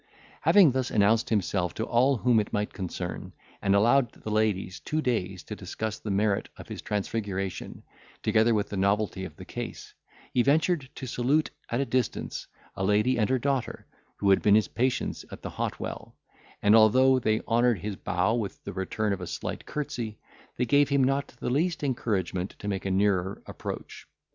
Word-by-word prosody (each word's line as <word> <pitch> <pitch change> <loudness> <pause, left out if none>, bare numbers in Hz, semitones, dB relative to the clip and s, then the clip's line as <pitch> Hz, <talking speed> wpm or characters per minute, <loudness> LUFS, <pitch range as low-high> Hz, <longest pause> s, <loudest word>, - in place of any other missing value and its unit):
Having 190 -8 +6
thus 130 0 -1
announced 110 +2 +3
himself 95 -4 0
to 110 - -2
all 130 +3 +3
whom 120 0 +3
it 105 - -2
might 105 -1 -1
concern, 90 -3 -5 0.3
and 100 0 +3
allowed 120 +4 +4
the 110 - -7
ladies 105 -4 0
two 155 - -2
days 100 - -1
to 105 - -7
discuss 105 +3 -4
the 110 - -6
merit 100 0 +1
of - - -10
his - - -6
transfiguration, 100 -2 -3 0.4
together 110 +1 +3
with 105 -1 0
the 100 - -4
novelty 100 0 +1
of - - -9
the - - -10
case, - - -7 0.4
he 125 - +4
ventured 150 +1 +2
to - - -6
salute, 130 +5 +1 0.2
at 120 - 0
a - - 0
distance, 130 -3 -2 0.3
a 95 - -3
lady 105 +6 +2
and 105 - +2
her 130 - +3
daughter, 135 0 -2 0.3
who 100 -1 +3
had 95 - +4
been 105 -1 +5
his 110 - +3
patients 125 +1 -1
at - - -9
the - - -5
hot - - -3
well; - - -6 0.5
and, 105 +2 +6
although 130 +4 +6
they 110 -2 +1
honoured 120 -1 +3
his 100 +3 -4
bow 95 +3 0
with 110 -5 -3
the - - -6
return 100 +2 -1
of 95 - -5
a 90 - -5
slight - - -5
curtsey, 120 -7 -4 0.4
they 125 - +1
gave 145 +4 +4
him 140 -1 +3
not 135 +2 +1
the - - -2
least 165 +4 0
encouragement 100 -8 -1
to 105 - -7
make 100 -1 -2
a - - 0
nearer 95 -1 +1
approach. - - -7
110 Hz, 185 wpm, -27 LUFS, 100-130 Hz, 0.5 s, Having